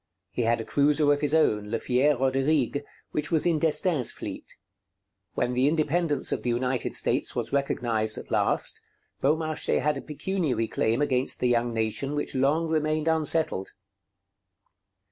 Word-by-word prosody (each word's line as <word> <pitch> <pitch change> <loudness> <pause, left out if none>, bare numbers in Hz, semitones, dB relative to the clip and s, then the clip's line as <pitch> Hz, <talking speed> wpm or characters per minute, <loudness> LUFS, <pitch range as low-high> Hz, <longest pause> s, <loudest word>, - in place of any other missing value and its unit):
He 125 - -2
had 115 0 +1
a 115 - -5
cruiser 145 +1 +3
of 145 - -3
his 150 +1 +2
own, 105 -9 +2
Le 115 - -1
Fier 130 +5 +1
Roderigue, 135 +1 +1 0.3
which 150 -1 -2
was 160 -3 +1
in 165 -3 +2
D'Estaing's 155 -3 +3
fleet. - - -8 0.8
When 120 - 0
the 125 +2 +2
independence 155 0 0
of - - -1
the 125 - -2
United 125 +1 -1
States - - 0
was - - -3
recognized 115 -6 0
at - - -9
last, - - +1 0.4
Beaumarchais 155 +2 +1
had 150 -1 0
a - - -8
pecuniary 150 -6 -2
claim 115 +7 0
against 130 -2 0
the 125 - +1
young 120 0 +1
nation 115 +5 -2
which 145 - -2
long 145 +5 +1
remained 155 0 0
unsettled. 160 - 0
140 Hz, 155 wpm, -26 LUFS, 125-155 Hz, 0.8 s, cruiser